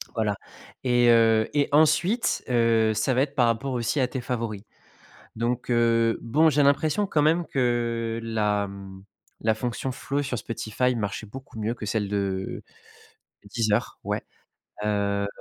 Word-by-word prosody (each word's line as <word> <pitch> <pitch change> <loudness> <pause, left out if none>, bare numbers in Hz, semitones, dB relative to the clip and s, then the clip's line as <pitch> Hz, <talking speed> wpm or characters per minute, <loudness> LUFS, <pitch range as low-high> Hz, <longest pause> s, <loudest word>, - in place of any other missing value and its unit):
Voilà. 105 -3 0 0.5
Et 120 -1 +4
heu 115 -1 +4
et 145 -1 +1
ensuite, 160 - +3
heu, 115 -2 +3
ça 110 +5 0
va 130 - +2
être 145 +1 -2
par 120 -3 +4
rapport 115 +4 -1
aussi 120 +4 -1
à 125 - +2
tes 130 0 -5
favoris. 115 -5 -4 0.7
Donc, 120 +2 -2
heu 115 -1 +3
bon, 155 +7 +3
j'ai 145 0 +3
l'impression 155 +8 +2
quand 150 -5 +1
même 165 +3 +3
que 115 -3 -1
la, 105 -3 0
mmh, 95 -1 -10 0.4
la 110 0 +2
fonction 125 +3 -3
flow 140 +2 -3
sur 130 -4 -3
Spotify 115 +3 -1
marchait 105 0 -3
beaucoup 130 0 -10
mieux 110 +2 -1
que 110 - -7
celle 105 -1 -1
de 95 -2 -2 0.8
de 100 - -15
Deezer. 110 0 0
Ouais, - - -2 0.6
heu 100 -1 0
115 Hz, 155 wpm, -25 LUFS, 110-130 Hz, 0.8 s, Et